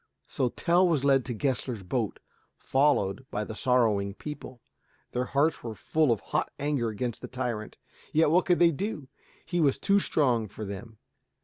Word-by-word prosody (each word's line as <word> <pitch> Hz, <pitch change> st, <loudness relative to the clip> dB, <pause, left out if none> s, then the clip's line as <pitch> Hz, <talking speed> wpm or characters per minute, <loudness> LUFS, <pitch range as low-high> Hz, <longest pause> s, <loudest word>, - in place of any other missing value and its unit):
So 125 Hz, -, 0 dB
Tell 175 Hz, +8 st, +3 dB
was 155 Hz, -6 st, +1 dB
led 135 Hz, -2 st, +4 dB
to 125 Hz, -, -3 dB
Gessler's 125 Hz, -3 st, -2 dB
boat, 110 Hz, +3 st, -2 dB, 0.4 s
followed 135 Hz, -6 st, +1 dB
by 105 Hz, -, -2 dB
the 110 Hz, -, -6 dB
sorrowing 110 Hz, -5 st, +2 dB
people. 140 Hz, -3 st, -8 dB, 0.5 s
Their 125 Hz, +1 st, -1 dB
hearts 145 Hz, +4 st, +1 dB
were 115 Hz, -2 st, -5 dB
full 155 Hz, +1 st, +1 dB
of 115 Hz, -, 0 dB
hot -, -, -2 dB
anger 140 Hz, -5 st, 0 dB
against 115 Hz, +2 st, -4 dB
the -, -, -6 dB
tyrant. 120 Hz, -4 st, -4 dB, 0.3 s
Yet 155 Hz, -1 st, +3 dB
what 180 Hz, +3 st, +3 dB
could 175 Hz, -2 st, +4 dB
they 170 Hz, -1 st, +5 dB
do? 155 Hz, -5 st, -4 dB, 0.4 s
He 175 Hz, -1 st, 0 dB
was 140 Hz, -4 st, +3 dB
too 200 Hz, 0 st, +3 dB
strong 125 Hz, -, +1 dB
for 105 Hz, +2 st, -7 dB
them. 105 Hz, +3 st, -8 dB
130 Hz, 175 wpm, -28 LUFS, 110-150 Hz, 0.5 s, they